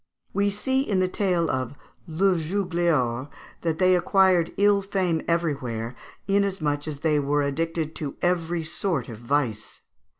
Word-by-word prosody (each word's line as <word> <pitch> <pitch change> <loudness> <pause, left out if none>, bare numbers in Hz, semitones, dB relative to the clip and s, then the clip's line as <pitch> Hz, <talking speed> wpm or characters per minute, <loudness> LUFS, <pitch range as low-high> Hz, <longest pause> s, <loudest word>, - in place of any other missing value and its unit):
We 200 +1 +2
see 260 +7 0
in 205 -8 0
the 185 - +2
tale 180 -3 0
of 130 0 -2 0.3
"Le 185 +4 +2
Jugleor" 165 -7 0 0.3
that 165 -2 -1
they 185 +1 +4
acquired 180 -1 +3
ill 205 0 +4
fame 185 -5 0
everywhere, 135 -9 -1 0.3
inasmuch 190 -7 0
as 145 -2 -5
they 155 -2 +2
were 145 +1 +1
addicted 160 +2 -2
to 145 -3 -4
every 175 -1 0
sort 155 -5 -2
of 110 -2 -8
vice. 120 -3 -2
165 Hz, 140 wpm, -25 LUFS, 145-190 Hz, 0.3 s, they